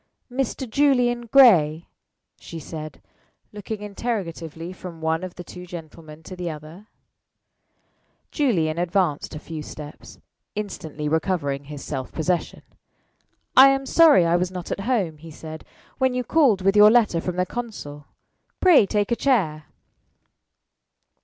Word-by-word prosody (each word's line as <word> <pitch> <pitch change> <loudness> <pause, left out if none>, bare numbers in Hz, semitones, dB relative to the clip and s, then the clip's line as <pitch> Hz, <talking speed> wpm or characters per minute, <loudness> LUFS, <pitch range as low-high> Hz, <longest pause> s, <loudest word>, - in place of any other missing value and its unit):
"Mr. 260 0 -3
Julian 245 -2 +2
Gray?" 175 - +5 0.5
she 165 - -9
said, 155 0 -9 0.5
looking 210 +1 -6
interrogatively 180 -6 -5
from 175 -2 -10
one 160 +2 -1
of 185 -1 -7
the 180 - -8
two 180 0 -11
gentlemen 160 -2 -11
to 185 - -9
the 180 -1 -4
other. 155 +6 -10 1.4
Julian 170 - 0
advanced 175 -4 -1
a - - -6
few 160 0 -7
steps, 150 0 -10 0.4
instantly 160 -8 -5
recovering 150 -4 -1
his 145 -1 -8
self 135 -3 -5
possession. 175 +2 -2 0.9
"I 270 +1 +9
am 270 0 0
sorry 295 - +6
I 170 +1 +3
was 180 0 -1
not 180 -2 -7
at - - -3
home," 185 -11 0
he 165 +1 -11
said, 160 0 -9 0.4
"when 260 -1 +1
you 250 - -1
called 245 -9 +3
with 195 +1 +3
your 210 0 +8
letter 215 -7 +3
from 180 0 -4
the 180 0 0
consul. 185 -11 -7 0.5
Pray 340 - +6
take 205 +1 -1
a - - +3
chair." 180 - 0
180 Hz, 140 wpm, -23 LUFS, 160-225 Hz, 1.4 s, I